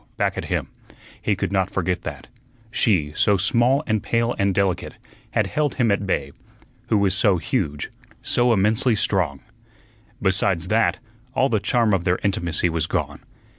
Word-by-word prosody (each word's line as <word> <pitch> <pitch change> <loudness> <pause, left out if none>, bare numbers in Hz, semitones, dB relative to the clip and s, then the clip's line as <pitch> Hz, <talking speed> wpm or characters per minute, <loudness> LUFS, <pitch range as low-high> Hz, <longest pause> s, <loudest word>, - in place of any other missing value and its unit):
back - - 0
at - - -4
him; - - -2 0.5
he 105 - +1
could 95 0 -3
not 95 -1 +1
forget 90 -2 -1
that. - - -7 0.5
She, 85 -11 +1
so 105 -2 +3
small 120 +8 +2
and 110 -2 0
pale 115 +1 0
and 100 0 +2
delicate, 95 -1 -1 0.3
had - - +1
held 150 -3 -1
him 120 -5 +2
at 100 0 0
bay, 70 -6 -1 0.6
who 110 - +2
was 100 -2 +2
so 95 -1 +3
huge, 75 -2 -2 0.3
so 120 0 +2
immensely 110 +3 +2
strong. 90 -9 0 0.8
Besides 95 -2 +1
that, 115 +1 +2 0.4
all 135 - +3
the 110 - +1
charm 115 0 +2
of 95 -3 +1
their 90 0 +1
intimacy 85 -4 0
was 80 -2 -1
gone. - - -2
100 Hz, 165 wpm, -22 LUFS, 90-110 Hz, 0.8 s, so